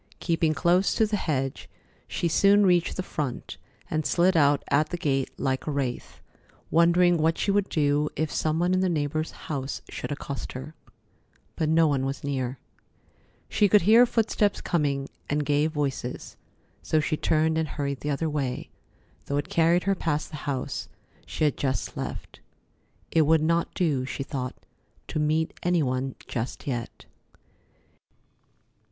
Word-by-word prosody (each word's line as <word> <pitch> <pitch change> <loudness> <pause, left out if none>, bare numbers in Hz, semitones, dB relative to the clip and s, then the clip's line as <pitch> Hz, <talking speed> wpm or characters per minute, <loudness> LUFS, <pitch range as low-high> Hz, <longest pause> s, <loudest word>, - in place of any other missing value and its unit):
Keeping 165 -2 +1
close 180 +3 +2
to 220 - +4
the 210 0 -1
hedge, 135 -8 -2 0.4
she 170 - -1
soon 200 +4 +5
reached 175 -2 +2
the 185 - -1
front, 145 -8 -4 0.3
and 155 0 -1
slid 180 +4 +3
out 145 -2 +4
at 145 +2 +3
the 175 - -3
gate 135 -5 0
like 130 +1 -1
a - - 0
wraith, 135 -4 -3 0.5
wondering 175 +1 +5
what 160 +1 +2
she 200 - +1
would 200 -1 +1
do 150 -1 +1
if 155 -1 -1
some 155 0 0
one 175 +2 +2
in 185 - +2
the 185 0 +2
neighbor's 155 -1 -1
house 140 -3 -5
should - - -5
accost 140 -1 -5
her. 130 +5 -7 0.8
But 155 - 0
no 165 +1 +5
one 140 -3 +1
was 135 +1 -3
near. 130 -2 -2 0.9
She 205 - +2
could 205 -1 +5
hear 230 +6 +7
footsteps 220 -3 +1
coming, 140 -4 0 0.2
and 145 0 0
gay 145 +1 +2
voices, 140 -5 -3 0.5
so 155 - +1
she 155 +1 0
turned 160 +1 +1
and 160 -1 0
hurried 140 -2 -3
the 150 - -4
other 150 +3 0
way, 140 -5 -3 0.6
though 140 - -1
it 145 - -2
carried 170 +2 +3
her 195 - +2
past 155 -5 -2
the 155 - -6
house 130 -2 -3 0.4
she - - -3
had 150 -3 +2
just 130 -7 -2
left. - - -6 0.7
It 160 -3 +3
would 160 -1 +4
not 170 +1 +1
do, 145 -8 +1
she 135 - -4
thought, 130 -2 -4 0.5
to - - -2
meet 155 +1 +1
any 175 -2 +2
one 130 0 -2
just 120 +5 -4
yet. 120 -5 -5
155 Hz, 160 wpm, -26 LUFS, 140-170 Hz, 0.9 s, hear